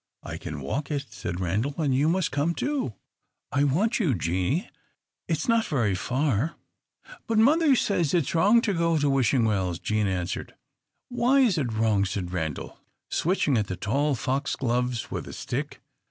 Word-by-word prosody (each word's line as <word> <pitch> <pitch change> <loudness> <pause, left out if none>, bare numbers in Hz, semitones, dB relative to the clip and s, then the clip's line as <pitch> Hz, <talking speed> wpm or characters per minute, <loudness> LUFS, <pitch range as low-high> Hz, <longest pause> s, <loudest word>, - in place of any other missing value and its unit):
"I - - -6
can 75 -2 -6
walk 135 - -3
it," 145 -2 -2
said 85 +1 -5
Randal, 105 +11 -1
"and 150 -5 +1
you 140 +4 +3
must 180 0 +1
come, 145 +5 0
too; 280 - -1 0.6
I 140 0 +2
want 190 - +2
you, 160 - +2
Jeanie. 95 - -1 0.6
It 165 - +1
's 155 - -4
not 230 -1 +3
so 155 - -3
very 110 -7 +2
far." 130 - 0 0.7
"But 225 - 0
mother 290 +5 +5
says 180 - +1
it 170 - +3
is - - -5
wrong 205 +8 +5
to 205 - +1
go 165 -1 +2
to 145 -1 +1
Wishing 130 -2 +2
Wells," 95 -5 0
Jean 110 +2 0
answered. 90 -1 -3 0.5
"Why 250 +2 +3
is 210 -10 +3
it 125 -5 -1
wrong?" 110 -3 +2
said 95 -2 -3
Randal, 80 -5 -4 0.3
switching 155 - +1
at 105 - -1
the 95 - -3
tall 140 +9 0
foxgloves 125 -2 -1
with - - -4
a - - -8
stick. - - -4
140 Hz, 180 wpm, -26 LUFS, 105-170 Hz, 0.7 s, mother